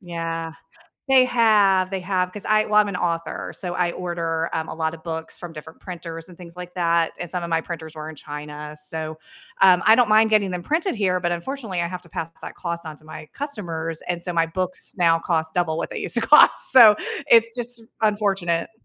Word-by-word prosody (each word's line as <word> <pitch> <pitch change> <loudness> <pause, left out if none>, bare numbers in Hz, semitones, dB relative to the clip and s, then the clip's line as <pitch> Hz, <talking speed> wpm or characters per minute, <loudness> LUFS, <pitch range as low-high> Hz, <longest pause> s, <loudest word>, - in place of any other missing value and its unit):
Yeah. 165 -2 -5 0.6
They 260 -1 +6
have, 210 -6 +3
they 195 - -2
have, 180 -1 -1
'cause 205 - -6
I 215 0 +3
well, 210 - -1
I'm 210 -1 +6
an 200 - -5
author, 170 -2 -3
so 180 -2 -1
I 180 -1 0
order, 170 -2 -3
um, 160 0 -3
a - - -6
lot 160 0 -2
of 160 - -14
books 160 -1 -4
from 175 -2 -8
different 160 +1 -12
printers 165 -2 -8
and 175 - -15
things 170 -2 -11
like 180 0 -9
that, 170 -2 +1
and 175 - -5
some 180 0 -4
of 170 - -5
my 165 0 +1
printers 160 -2 -8
were 155 0 -7
in 160 - -8
China, 150 +1 -8
so, 155 +1 -2 0.4
um, 185 -2 +6
I 220 +1 +6
don't 245 -3 +3
mind 220 +1 +4
getting 200 -3 +2
them 175 -1 -4
printed 325 - -1
here, 190 -4 0
but 175 -1 -1
unfortunately, 195 0 -4
I 170 - -2
have 180 0 -7
to 170 - -18
pass 165 +1 -5
that - - -8
cost 170 -2 -5
on 155 - -7
to - - -13
my 155 0 -10
customers, 170 - -4
and 175 -1 -3
so 180 - -2
my 165 -1 +1
books 185 +2 0
now 165 -2 +3
cost 160 -2 -1
double 170 -3 0
what - - -4
they - - -5
used - - -3
to 235 - +5
cost, 290 +7 +6
so 230 -5 +9 0.3
it's 230 0 +4
just 240 -1 -2 0.2
r 220 - +4
unfortunate. 195 -5 -1
175 Hz, 230 wpm, -22 LUFS, 165-205 Hz, 0.6 s, so